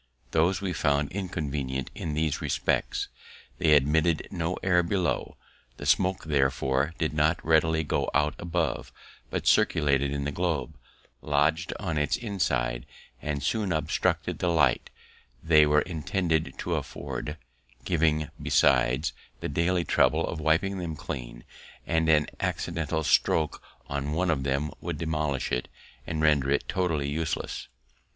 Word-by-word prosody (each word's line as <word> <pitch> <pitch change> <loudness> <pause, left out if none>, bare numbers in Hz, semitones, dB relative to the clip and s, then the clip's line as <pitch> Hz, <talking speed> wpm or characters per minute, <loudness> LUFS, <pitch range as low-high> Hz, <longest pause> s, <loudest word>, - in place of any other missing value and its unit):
Those 85 +5 +2
we 95 -2 -2
found 70 -2 +1
inconvenient 75 -8 -3
in 75 -2 -4
these 80 -1 0
respects: - - 0 0.5
they 75 - +4
admitted 75 +3 +2
no 85 -1 -2
air 90 -2 +4
below; 90 0 -1 0.4
the - - -7
smoke, 95 +1 +2
therefore, 65 0 +1
did 80 -2 -1
not 75 +2 +2
readily 80 0 +3
go 75 - 0
out 75 0 +2
above, 85 -5 -2 0.4
but - - -3
circulated 70 -2 +3
in 70 0 -2
the 70 - -2
globe, 80 -1 -1 0.5
lodg'd 75 +3 +1
on 85 -7 -1
its 75 0 +1
inside, 65 - -1 0.3
and 70 -2 -3
soon 105 -4 0
obstructed 80 -2 0
the 90 - 0
light 80 -7 +2 0.5
they 75 -2 +6
were 75 0 +4
intended 80 -1 -1
to - - -2
afford; 75 +1 -4 0.5
giving, 75 -3 +1
besides, 65 +4 +3 0.3
the - - -3
daily 85 +4 +1
trouble - - +3
of 85 - -4
wiping 85 +5 +1
them 85 -3 -4
clean; - - -6 0.4
and 80 -1 +1
an 75 -2 +5
accidental 80 -2 -2
stroke 80 0 +2 0.3
on 70 +1 -3
one 90 +2 +1
of 70 -4 0
them 70 +3 -1
would - - -4
demolish 75 -5 -1
it, - - -1 0.4
and 80 -1 -2
render 75 -3 +3
it 70 - +1
totally 80 -6 0
useless. 80 +2 -3
80 Hz, 140 wpm, -27 LUFS, 70-85 Hz, 0.5 s, they